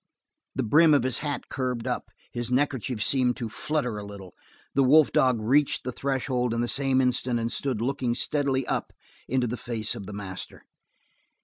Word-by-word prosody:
The 130 - 0
brim 155 +6 +5
of 140 - +3
his 130 -2 +1
hat 145 -3 -4
curved 125 -3 -3
up, 125 - -3 0.2
his 120 0 -3
neckerchief 130 -4 0
seemed 125 -3 +2
to 115 - -3
flutter 125 -4 -2
a - - -7
little. 100 -3 -10 0.4
The 140 - +3
wolf 145 +3 +6
dog 130 -3 +3
reached 135 +7 +2
the 125 - -3
threshold 125 -2 -1
in 115 - 0
the 120 - 0
same 135 0 +2
instant 125 -1 +1
and 115 0 -2
stood 130 -5 -1
looking 125 -1 -1
steadily 135 -3 0
up - - -2 0.3
into 130 0 +1
the 120 +1 -3
face 115 -3 -3
of 100 -5 -8
the 105 - -7
master. 95 -2 -7
125 Hz, 185 wpm, -26 LUFS, 115-135 Hz, 0.4 s, wolf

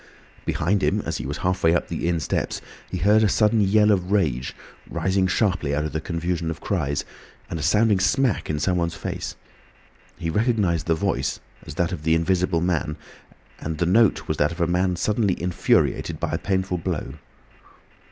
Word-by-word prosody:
Behind 95 +5 +1
him - - +1
as - - -3
he - - -5
was 70 - -3
halfway 90 -2 +2
up - - 0
the - - -3
inn 85 -1 +1
steps - - -2 0.3
he - - -3
heard 105 +5 +4
a 110 - +4
sudden 105 +2 +3
yell 105 +2 +4
of 95 -2 0
rage, 70 -11 0 0.3
rising 95 0 +1
sharply 90 -7 +1
out 75 +1 0
of 75 - -4
the 80 - -2
confusion 85 +1 -2
of 80 - -5
cries, 75 -8 -1 0.5
and 80 - -3
a - - -4
sounding 105 +4 +3
smack 120 +5 +1
in 75 - 0
someone's 85 0 0
face. - - -5 0.8
He 85 -1 -3
recognised 105 -7 +1
the 80 - +3
voice 80 - -1 0.3
as - - -7
that 85 0 0
of 90 -5 -4
the 80 +1 +2
Invisible 90 0 +1
Man, 85 -3 -1 0.6
and 80 0 -4
the 85 - +1
note 110 +5 +3
was - - -1
that 75 +2 +2
of 85 - -8
a 85 - +3
man 90 +2 +1
suddenly 105 +1 0
infuriated 90 0 +1
by - - -2
a - - -1
painful 95 -2 -1
blow. 65 -4 -3
90 Hz, 185 wpm, -24 LUFS, 80-100 Hz, 0.8 s, heard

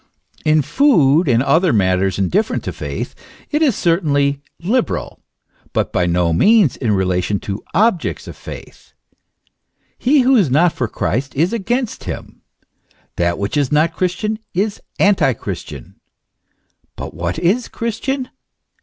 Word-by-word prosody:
In 155 -1 +3
food 170 - +3
and 120 -1 +3
other 165 +4 +3
matters, 95 -2 +1
indifferent 190 - 0
to - - -3
faith, - - -5 0.4
it 300 +1 +1
is 280 -9 +3
certainly 145 -5 +1 0.2
liberal; 225 +8 -1 0.5
but - - -1
by 90 -1 +1
no 85 -1 +1
means 205 - +4
in 115 -5 0
relation 95 +1 0
to 100 0 -5
objects 200 -3 +1
of - - -8
faith. - - -11 1.1
He 275 +3 +4
who 260 +2 +4
is 195 - +3
not 160 +6 +3
for 120 - -2
Christ 130 +5 -2
is 165 +9 +1
against 235 +3 -2
him; - - -7 0.8
that 85 0 +1
which 100 +1 -3
is 145 -3 +1
not 160 +2 +2
Christian 200 +5 -1 0.2
is 205 +3 -1 0.2
antichristian. 135 - 0 1.0
But - - -7
what - - -3
is 185 +9 +1
Christian? 250 +3 -3
160 Hz, 135 wpm, -18 LUFS, -, 1.1 s, means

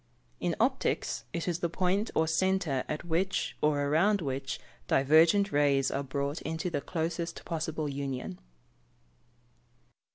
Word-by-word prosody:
_ - - -39 0.4
In - - 0
optics, - - 0
it 170 +1 -3
is 175 -1 0
the 170 - 0
point 185 +5 0
or 160 - +3
centre 165 -5 +1
at 150 +3 -3
which, 175 +3 0
or 150 -1 +2
around 170 +9 +3
which, 135 -4 -3 0.3
divergent 160 +8 +5
rays 140 -2 +3
are 140 - -1
brought 140 +2 -3
into 160 +3 -3
the 145 - -1
closest 165 +2 -3
possible 160 -2 -2
union. 135 -8 -4
160 Hz, 135 wpm, -30 LUFS, 140-175 Hz, 0.4 s, divergent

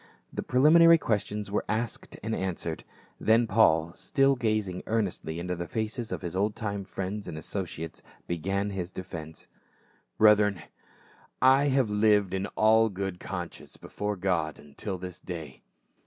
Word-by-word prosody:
The - - -2
preliminary 165 +6 +6
questions 105 -5 -2
were 105 - 0
cisked 110 +2 -3
and 110 +1 -2
answered; 85 -3 -3 0.4
then 115 +2 +4
Paul, 85 -7 +3
still 135 +5 +2
gazmg 110 -6 -1
earnestly 95 -7 -2
into 90 +1 -3
the 85 0 -5
faces 110 +2 -3
of - - -4
his 85 0 -4
old 105 +2 0
time 100 -3 -4
friends 100 +2 -5
and 80 - -6
associates, 80 -2 -5 0.2
began 95 +4 -1
his 90 -3 -4
defence. 80 -4 -8 0.4
" - - -37
Brethren, 105 -4 +5 0.8
I 135 +2 +5
have 135 -6 +2
lived 105 -2 +3
in 95 +1 -1
all 110 +1 +5
good 95 -2 -4
conscience 90 -2 -7
before 105 0 -4
God 90 -6 -1
until 75 +7 -6
this 90 -1 -7
day." 80 -7 -7
100 Hz, 145 wpm, -28 LUFS, 90-110 Hz, 0.8 s, preliminary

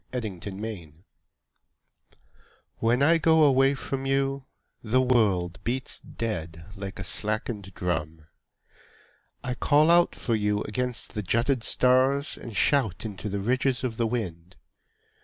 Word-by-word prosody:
The 125 - -2
Taxi 100 -4 -6 1.8
When 120 +4 +2
I 165 +3 +5
go 160 -1 +4
away 135 -1 +4
from 135 0 -4
you 135 0 0 0.4
The 120 +3 +1
world 105 -9 +2
beats 125 +2 -3
dead 85 -7 -5
Like 95 0 -7
a 95 - -5
slackened 105 +1 -3
drum. 80 -3 -3 1.2
I 125 - -2
call 150 +5 +4
out 175 0 +4
for 115 - -2
you 105 -1 0
against 125 +2 -4
the 105 - -2
jutted 115 +6 +1
stars 130 +4 +2
And 115 - -9
shout 115 - +1
into 105 -1 -5
the 100 0 -3
ridges 130 +4 0
of 120 -3 -3
the 115 - +1
wind. 90 -7 -4
115 Hz, 130 wpm, -26 LUFS, 100-130 Hz, 1.8 s, I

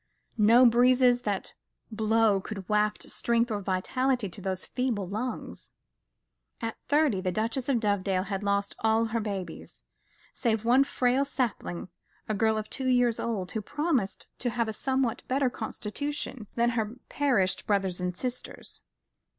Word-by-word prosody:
No 230 +4 +7
breezes 245 +1 +5
that 205 -5 -2 0.4
blow 220 -1 +3
could 195 -2 -7
waft 210 0 +1
strength 235 0 +1
or 205 -1 -1
vitality 220 +5 0
to 195 - -10
those 190 -1 -3
feeble 240 -7 -1
lungs. 220 +7 -5 0.9
At 225 -1 -3
thirty 285 -9 +3
the 185 -1 -1
Duchess 230 +7 -1
of 255 -4 +3
Dovedale 200 -3 +1
had 195 -1 -3
lost 200 0 0
all 220 +1 +3
her 230 +1 -1
babies, 200 -4 -5 0.5
save 225 -2 0
one 255 +4 +5
frail 255 0 +2
sapling, 245 -11 -2 0.4
a 215 - 0
girl 220 +1 +2
of 215 0 -3
two 265 - -3
years 245 -2 +3
old, 200 -6 -2
who 220 - -2
promised 275 - -1
to 245 - 0
have 235 -1 0
a 220 - -3
somewhat 260 0 0
better 260 -1 +1
constitution 240 +1 -4
than 235 0 +3
her 225 -1 -2
perished 245 -10 +1
brothers 195 -3 +1
and 180 0 -2
sisters. 250 +2 -5
225 Hz, 150 wpm, -28 LUFS, 200-250 Hz, 0.9 s, No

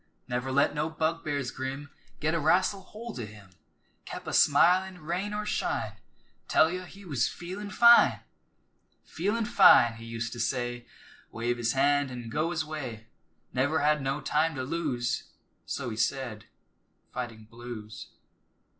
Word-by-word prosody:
Never 125 +1 -2
let 140 +2 +3
no 150 +2 -1
bugbears 155 -4 -2
grim 135 +2 -5 0.3
Git 155 +2 0
a 165 - +1
wrastle 185 +5 +2
holt 215 - -9
o' 115 - -3
him, 100 -3 -14 0.5
Kep' - - -7
a - - -5
smilin' 180 +5 +4
rain 175 +6 -3
or 210 0 -3
shine, - - -1 0.6
Tell 160 +1 +4
you 185 0 -4
he 195 +2 -13
was 140 -9 0
"feelin' 190 +4 -7
fine!" 235 +4 +6 0.8
"Feelin' 210 +7 -1
fine," 180 - +6
he 115 - -10
used 115 0 -4
to 120 - -8
say 120 0 -2 0.4
Wave 120 +1 -2
his 120 -1 +1
hand 140 +1 +2
an' 120 -2 -7
go 155 +5 0
his 160 -2 -2
way. 125 -8 -7 0.4
Never 140 +4 +1
had 150 0 +3
no 135 +2 -2
time 155 +3 +1
to 130 - -3
lose 130 -6 -2 0.4
So 120 - -3
he 110 - -6
said, 115 -2 -2 0.7
fighting 115 -3 -6
blues. 115 -1 -9
145 Hz, 150 wpm, -28 LUFS, 120-170 Hz, 0.8 s, fine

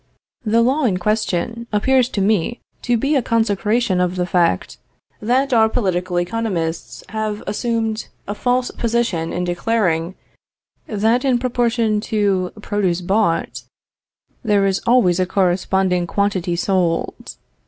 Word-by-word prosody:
The 230 +1 +3
law 270 +4 +2
in 195 -6 +1
question, 215 +3 -1
appears 250 +4 +2
to 200 - -2
me 210 +3 +1 0.2
to 245 -1 +1
be 275 +6 0
a 270 - +3
consecration 220 -3 +1
of 180 0 0
the 180 -1 0
fact, 175 - 0 0.4
that 255 +5 +1
our 220 -1 +5
political 185 -6 -1
economists 175 -4 -3
have 215 0 -3
assumed 225 0 -2 0.2
a 205 - -2
false 245 +3 0
position 230 -9 -1
in 180 - -2
declaring, 175 -2 0 0.7
that 225 +3 +1
in 260 -3 +2
proportion 235 -3 0
to 200 -4 +1
produce 195 -5 0
bought, 190 -1 0 0.8
there 205 -3 +2
is 195 0 0
always 225 -8 +4
a 185 - +1
corresponding 185 -1 +1
quantity 190 -3 0
sold. 175 -2 -1
210 Hz, 130 wpm, -19 LUFS, 180-230 Hz, 0.8 s, our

